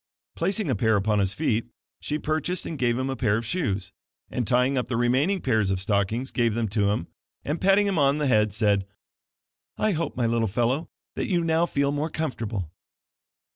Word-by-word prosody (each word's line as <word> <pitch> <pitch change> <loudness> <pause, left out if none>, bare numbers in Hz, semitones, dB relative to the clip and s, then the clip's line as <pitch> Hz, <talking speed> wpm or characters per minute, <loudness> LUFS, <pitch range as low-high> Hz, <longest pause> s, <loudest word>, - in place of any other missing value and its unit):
Placing 195 +3 0
a - - +1
pair 110 +2 +2
upon 105 +1 +1
his 95 0 +1
feet, 115 -7 0 0.3
she 150 - -2
purchased 155 +4 -1
and 165 - -4
gave 120 -3 +1
him 130 +1 -1
a 135 - -2
pair 110 -4 +1
of 115 - -4
shoes, 100 - -2 0.4
and 120 -4 -2
tying 125 +2 +3
up 125 - -1
the 120 - -1
remaining 130 +11 +2
pairs 110 -6 +1
of 95 -1 0
stockings, 105 +5 0
gave 115 -4 +1
them 115 -1 0
to 100 -1 +1
him, 100 -5 -1 0.4
and 150 +4 -2
patting 195 +2 +4
him 195 -5 0
on 140 0 +3
the 150 - 0
head 110 -5 +3
said: 100 -2 +1 0.9
"I 215 - +1
hope 165 -6 -2
my 120 - +1
little 115 -1 +1
fellow, 120 - 0 0.2
that - - -3
you 175 -3 +1
now 165 +1 +2
feel 140 -2 0
more 145 +2 -1
comfo 155 -3 -3
rtable." 95 -6 -4
125 Hz, 205 wpm, -25 LUFS, 105-155 Hz, 0.9 s, patting